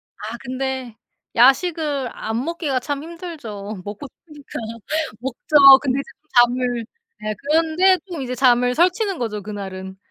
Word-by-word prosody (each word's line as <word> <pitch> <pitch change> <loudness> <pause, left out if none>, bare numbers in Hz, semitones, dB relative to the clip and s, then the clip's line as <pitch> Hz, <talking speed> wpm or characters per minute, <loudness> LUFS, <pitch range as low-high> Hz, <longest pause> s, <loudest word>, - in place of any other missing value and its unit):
아 220 +3 -7
근데 260 -2 -4 0.4
야식을 280 +1 +3
안 225 +3 -3
먹기가 315 -5 -2
참 285 +2 -4
힘들죠. 235 - -7
먹고 210 +7 -7 0.2
싶으니까. 300 -4 -9 0.6
먹죠. 270 +2 +6
근데 270 -1 0
이제 275 - -6
또 310 - -42
잠을 245 -1 0 0.3
네. 215 0 -3
그런데 325 +5 +3
또 340 -6 -6
이제 255 -1 -4
잠을 250 -1 +3
설치는 370 - +2
거죠, 215 -4 -3
그날은. 190 -2 -7
265 Hz, 275 characters per minute, -21 LUFS, 235-310 Hz, 0.6 s, 먹죠